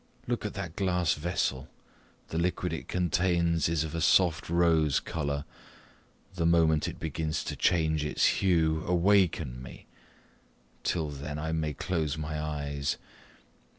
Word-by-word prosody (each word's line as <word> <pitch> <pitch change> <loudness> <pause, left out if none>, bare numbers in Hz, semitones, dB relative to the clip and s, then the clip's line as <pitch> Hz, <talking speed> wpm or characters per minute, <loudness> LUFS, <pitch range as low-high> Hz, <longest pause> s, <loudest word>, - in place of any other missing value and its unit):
Look - - -2
at - - -8
that 85 -1 -5
glass 90 -4 +1
vessel. 75 -4 -2 0.6
The 80 - -2
liquid 90 0 -1
it 80 - -5
contains 85 -2 +1
is 80 -2 +1
of 80 -1 -5
a 85 - -2
soft 85 -1 +3
rose 80 -4 +3
colour: 70 -3 -3 0.9
the 90 -2 -2
moment 80 -2 +3
it - - -6
begins 80 0 -2
to - - -4
change 80 -3 +2
its 75 - +1 0.2
hue, 80 -4 +2
awaken 90 -8 +2
me 65 - -11 1.0
till 80 -3 -1
then 75 +1 -6
I 80 +2 -3
may 80 -2 -1
close 80 -4 -1
my 75 0 -3
eyes. 70 -2 -2
80 Hz, 140 wpm, -29 LUFS, 75-85 Hz, 1.0 s, soft